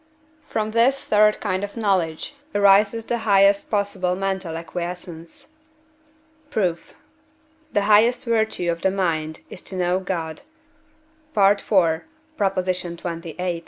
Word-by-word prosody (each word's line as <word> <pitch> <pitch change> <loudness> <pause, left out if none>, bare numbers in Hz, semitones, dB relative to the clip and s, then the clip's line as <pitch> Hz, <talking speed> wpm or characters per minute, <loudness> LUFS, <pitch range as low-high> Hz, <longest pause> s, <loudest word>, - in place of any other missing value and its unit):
From 215 0 -2
this 235 +5 +3
third 210 -4 +3
kind 190 -2 -2
of 205 +3 -6
knowledge 185 -7 0 0.2
arises 205 +3 +4
the 240 - -1
highest 200 -2 +3
possible 200 -3 0
mental 190 -3 -3
acquiescence. 170 0 -7 1.0
Proof. 185 - -2 0.8
The 205 - +2
highest 215 +6 +4
virtue 220 -6 0
of 170 0 -5
the 190 - +3
mind 160 -5 -2
is - - -7
to 190 - -8
know 180 0 +1
God 170 -4 -4 1.0
(IV. 195 -4 +3 0.3
xxviii.) 180 - -2
190 Hz, 110 wpm, -22 LUFS, 175-205 Hz, 1.0 s, arises